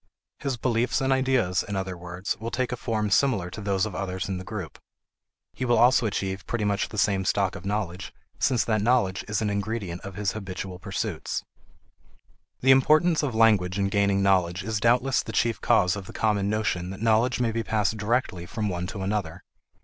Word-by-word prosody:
His 135 -3 -2
beliefs 120 0 +1
and 135 0 +2
ideas, 130 -9 +2
in 100 - -5
other 95 -1 -3
words, 90 +2 -4
will 115 +1 -4
take 125 +1 -2
a - - -1
form 110 -4 -2
similar 100 -8 +2
to 105 - -7
those 100 -1 0
of 110 - -5
others 95 0 -3
in 95 -2 -3
the - - -7
group. 95 -4 -7 0.7
He - - -5
will 120 -1 +3
also 125 -1 +5
achieve 95 -2 -3
pretty 115 -3 -1
much 100 -1 0
the 105 - -8
same 95 -1 +2
stock 95 0 +1
of 95 -1 -7
knowledge 95 -3 -3 0.3
since 125 -4 +2
that 110 -2 +1
knowledge 110 -5 +2
is 105 +1 -1
an 105 - 0
ingredient 100 -4 -3
of 95 -1 -8
his 100 -1 -1
habitual 95 -3 -6
pursuits. 95 - -3 1.2
The 135 - +5
importance 155 +5 +4
of 135 -6 -2
language 105 -5 +3
in 100 -1 +1
gaining 100 -1 +2
knowledge 95 -2 +2
is 110 +1 -2
doubtless 125 +4 +3
the 110 - -8
chief 115 +1 +1
cause 105 -6 +3
of 100 -2 -7
the - - -9
common 105 -2 +1
notion 100 -4 -1
that 95 +3 -7
knowledge 115 +3 +3
may 120 -2 +1
be 115 +1 -1
passed 110 -2 0
directly 105 -5 -1
from 105 0 -2
one 90 -1 -3
to 100 -1 -5
another. 95 -4 -3
105 Hz, 200 wpm, -26 LUFS, 95-115 Hz, 1.2 s, also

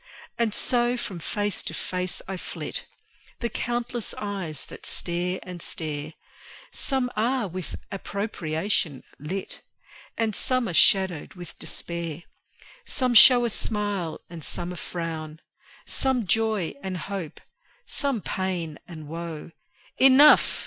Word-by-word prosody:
And 230 -2 +1
so 240 +2 +1
from 200 -7 -5
face 205 +5 -1
to - - -3
face 180 0 -2
I 195 - -3
flit, 180 - -5 0.5
The 235 - -1
countless 240 -1 -2
eyes 190 -8 -3
that - - -11
stare 180 +1 0
and 180 -1 -7
stare; 155 -1 -3 0.6
Some 260 -3 0
are 235 +1 +1
with 185 -1 -5 0.2
approbation 190 - -1 0.2
lit, 180 +7 -5 0.6
And 225 -2 +1
some 255 -2 +1
are 175 - -3
shadowed 190 -2 +4
with 175 -2 -10
despair. 170 -1 -4 0.6
Some 255 - 0
show 245 +1 +9
a 235 - +1
smile 205 -7 -1
and 165 -2 -9
some 175 +3 -3
a - - -5
frown; 160 -3 -5 0.5
Some 260 -4 +1
joy 215 -2 +1
and 190 -1 -3
hope, 180 -3 -5 0.5
some 275 -7 0
pain 180 -6 -2
and 155 -3 -9
woe: 165 0 -6 0.5
Enough! 270 +3 +8
190 Hz, 125 wpm, -26 LUFS, 170-230 Hz, 0.6 s, show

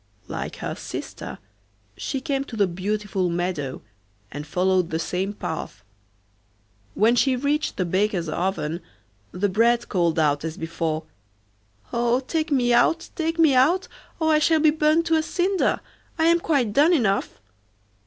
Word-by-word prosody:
Like - - -5
her - - -4
sister - - -7 0.6
she 270 - -3
came 275 -2 -1
to 245 - -8
the 205 -2 +3
beautiful 190 +1 -2
meadow, 170 -6 -3 0.5
and 145 +2 -7
followed 185 +1 +1
the 160 - -1
same 185 +4 -2
path. 160 - -6 1.1
When 225 +4 +4
she 260 +1 +3
reached 290 +4 -1
the 185 - 0
baker's 185 -1 0
oven 170 -1 -2 0.5
the 190 +3 0
bread 235 +4 +2
called 170 -3 +1
out 145 -2 +2
as 160 -1 -4
before: 160 -1 -2 0.9
'Oh! 240 +1 +2
take 310 +4 -2
me 245 -3 +3
out, 330 +8 +3
take 330 0 -1
me 320 -4 +5
out, 310 +9 +3 0.3
or 315 -1 +3
I 305 - +5
shall 320 +1 +3
be 310 0 +5
burnt 310 +2 +2
to 325 -1 +3
a - - +2
cinder. 370 +4 0 0.4
I 320 - +2
am 335 +1 +5
quite 275 -11 +1
done 305 +8 +5
enough. 215 - 0
225 Hz, 155 wpm, -24 LUFS, -, 1.1 s, me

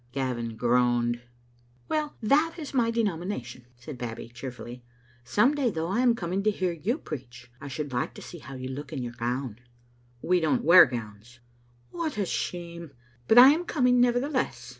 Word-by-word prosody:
Gavin 120 -4 -3
groaned. 120 0 +1 0.7
"Well, 305 -1 -2
that 305 +9 +3
is 300 -5 -7
my 240 -3 +2
denomination," 175 - -3
said 120 +2 -10
Babbie, 115 -1 -6
cheer 125 +3 -7
fully. 120 0 -10 0.4
"Some 210 - +3
day, 280 -4 +1
though, 165 -4 -3
I 195 - 0
am 245 -2 +4
coming 185 -1 -2
to 215 - +2
hear 185 -3 -1
you 180 - -2
preach. 120 - -9
I 140 - -7
should 140 0 -5
like 125 - -2
to - - -10
see 175 - -10
how 140 -2 -10
you 130 0 -6
look 140 +1 -7
in 135 -5 -4
your 120 -1 -6
gown. 120 -1 -3 0.3
" 120 0 -34
"We 180 +1 +3
don't 160 -3 +1
wear 175 0 +9
gowns." 115 -1 -8 0.5
"What 330 -7 -3
a 205 - 0
shame! 170 -3 -5 0.3
But 225 - +4
I 255 +2 +11
am 315 +5 +2
coming, 250 -7 +2
nevertheless. 245 - 0
150 Hz, 180 wpm, -27 LUFS, -, 0.7 s, I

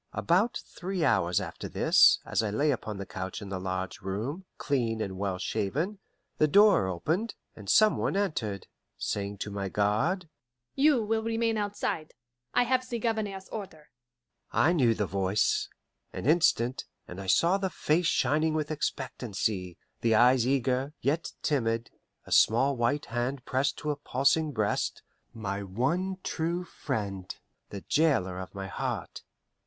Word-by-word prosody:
About 210 +8 +2
three 180 -2 -3
hours 90 - +2
after - - -6
this, - - +6
as - - 0
I 110 - -1
lay 145 +9 +2
upon 110 -5 -4
the 100 - -5
couch 95 +2 -5
in 100 -2 -8
the 95 -1 -3
large 95 0 -4
room, 115 - -4
clean 120 -6 0
and 95 -3 -3
well 95 -1 -2
shaven, 155 - -2 0.4
the 155 - +5
door 200 - +5
opened, 160 - -1 0.2
and 100 -3 -9
some 215 0 +5
one - - -1
entered, 110 - -2 0.3
saying 100 0 -3
to 105 - -5
my 100 -1 -3
guard, 110 - +1 0.5
"You 275 -4 +4
will 220 +1 0
remain 225 0 0
outside. 205 -6 -3 0.4
I 245 - +3
have 255 +1 0
the 235 - -2
Governor's 210 -4 -2
order." 185 -8 -8 0.6
I 170 - +3
knew 125 -9 +3
the 105 - 0
voice; 95 +2 +1 0.4
an - - -5
instant, 130 -5 +2 0.2
and 90 +2 -7
I 95 - -8
saw 170 - +4
the 190 -1 -1
face 165 0 +1
shining 155 +1 +2
with 155 0 -1
expectancy, 110 - -3 0.2
the 115 -1 +2
eyes 125 +1 +5
eager, 135 +2 0
yet 155 +5 0
timid, 115 -6 0 0.3
a - - -13
small 130 +5 +4
white 120 +5 0
hand 120 +2 -3
pressed 135 +1 0
to 150 - -2
a - - -2
pulsing 145 +3 +1
breast 110 -5 -1 0.3
my 100 -4 -4
one 140 - -1
true 170 +2 -2
friend, 100 - -4 0.3
the 100 - -7
jailer 115 - +1
of 95 +2 -8
my 95 -1 -4
heart. 95 - -4
130 Hz, 155 wpm, -29 LUFS, -, 0.6 s, this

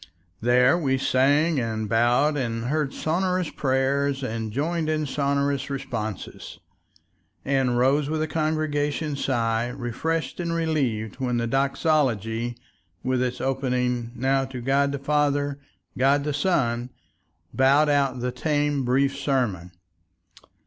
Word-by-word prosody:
There 125 +6 +4
we 135 -5 +1
sang 140 +4 +2
and 110 -2 -2
bowed 120 +7 +3
and 115 -4 -2
heard 145 +1 0
sonorous 180 +1 -1
prayers 135 +1 0
and 110 -3 -3
joined 155 +6 -1
in 155 -1 0
sonorous 140 0 0
responses, 125 -7 -5 0.9
and 135 -3 +1
rose 140 +3 +2
with 155 0 -1
a - - -2
congregational 155 -1 -1
sigh 115 -4 0
refreshed 135 +7 -3
and 170 -1 -2
relieved 135 -11 -1
when 125 -2 0
the 115 - 0
doxology, 120 -4 0 0.5
with 130 -1 0
its 125 0 -2
opening 125 -3 -1
"Now 135 +2 +1
to 130 -1 -7
God 140 +3 +1
the 140 - -2
Father, 145 0 0 0.4
God 140 +2 +3
the 150 0 -2
Son," 125 -7 0 0.6
bowed 140 +3 +4
out 140 -4 +1
the 125 0 -1
tame, 145 +1 0
brief 135 +3 +2
sermon. 125 - -1
135 Hz, 125 wpm, -25 LUFS, 125-145 Hz, 0.9 s, There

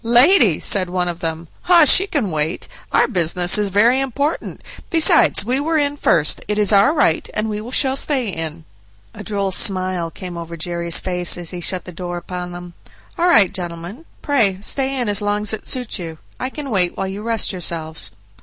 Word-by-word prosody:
"Lady!" 240 - +5
said 185 -3 +1
one 180 0 -1
of 175 -1 -4
them; 165 0 -4 0.2
"oh! 340 -3 +7
she 380 +7 +6
can 260 - -2
wait; 155 +1 -3 0.2
our - - +3
business 175 +2 +1
is 205 -1 0
very 230 +7 +3
important, 275 +4 -2 0.3
besides 325 -2 +3
we 255 +2 +1
were 320 +3 0
in 290 -1 0
first, 160 - +1
it 210 0 -2
is 210 0 +2
our 200 +8 +5
right, 165 - +1
and 215 +1 -1
we 215 +2 -5
shall 265 0 +2
stay 270 -3 -1
in." 165 -3 -6 0.5
A - - -9
droll 200 -2 -2
smile 185 -3 +1
came 175 +1 -8
over 170 0 -7
Jerry's 170 0 0
face 180 -2 -1
as 175 -1 -5
he 180 -1 -6
shut 185 +1 -4
the 180 - -8
door 175 0 -6
upon 180 0 -6
them. 175 0 -9 0.4
"All 350 0 +1
right, 205 - +5
gentlemen, 175 - -7 0.2
pray 225 -10 +2
stay 270 +4 -2
in 245 - -1
as 205 0 -1
long 205 0 -1
as 210 - 0
it 220 - -6
suits 250 -5 -1
you; 165 -2 -7 0.2
I 255 - -2
can 280 -1 -7
wait 180 -4 +1
while 195 - -2
you 195 +2 -6
rest 225 0 -1
yourselves." 165 -4 -1
195 Hz, 200 wpm, -19 LUFS, 175-250 Hz, 0.5 s, oh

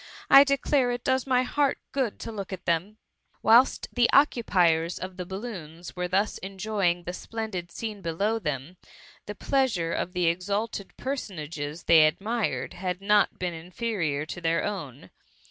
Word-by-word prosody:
I 275 - +11
declare 275 -2 +1
it 245 0 -3
does 260 0 +1
my 255 -1 +3
heart 280 +2 +1
good 260 -6 -1
to - - -5
look 200 -3 -6
at 185 -1 -7
them 170 +5 0
T - - -33 0.5
Whilst 235 +4 +5
the 240 -1 +3
occupiers 180 - +3
of 185 0 -6
the 180 -1 -5
balloons 180 -5 -7
were 180 0 -2
thus 195 +4 0
enjoying 190 -2 -1
the 180 - -5
splendid 210 -4 -5
scene 215 +1 -6
below 200 +7 -1
them, 150 - -4 0.5
the 210 - -5
pleasure 220 -11 0
of 180 - -3
the 180 -1 0
exalted 200 +5 -2
personages 165 - -5
they 160 -2 +7
admired, 215 +7 -2
had 180 0 -3
not 205 +1 +3
been 180 -1 -2
inferior 165 -3 -3
to 175 - -7
th^r 165 0 +1
own. 160 -11 -6
190 Hz, 160 wpm, -27 LUFS, 170-225 Hz, 0.5 s, I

